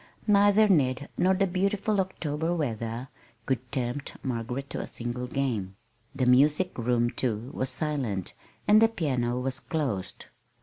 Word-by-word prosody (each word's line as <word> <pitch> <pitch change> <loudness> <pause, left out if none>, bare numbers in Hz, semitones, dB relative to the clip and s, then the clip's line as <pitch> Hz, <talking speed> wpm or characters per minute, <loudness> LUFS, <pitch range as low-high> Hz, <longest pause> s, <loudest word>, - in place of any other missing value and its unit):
Neither 205 +1 +5
Ned 140 -7 +2
nor 190 +1 +3
the 195 +1 +2
beautiful 195 +2 +1
October 165 -3 -2
weather 115 -4 -3 0.4
could 130 -2 -2
tempt 130 +1 -3
Margaret 125 +2 -3
to - - -3
a - - -6
single 120 +1 -4
game. 115 -9 -2 0.4
The 130 - +1
music 145 +8 +4
room, 120 0 +1
too, 120 0 -2
was 130 - 0
silent, 130 - -2 0.3
and 215 +1 +7
the 225 - +7
piano 125 - -1
was 130 +1 -2
closed. 125 - -3
135 Hz, 140 wpm, -28 LUFS, 120-175 Hz, 0.4 s, and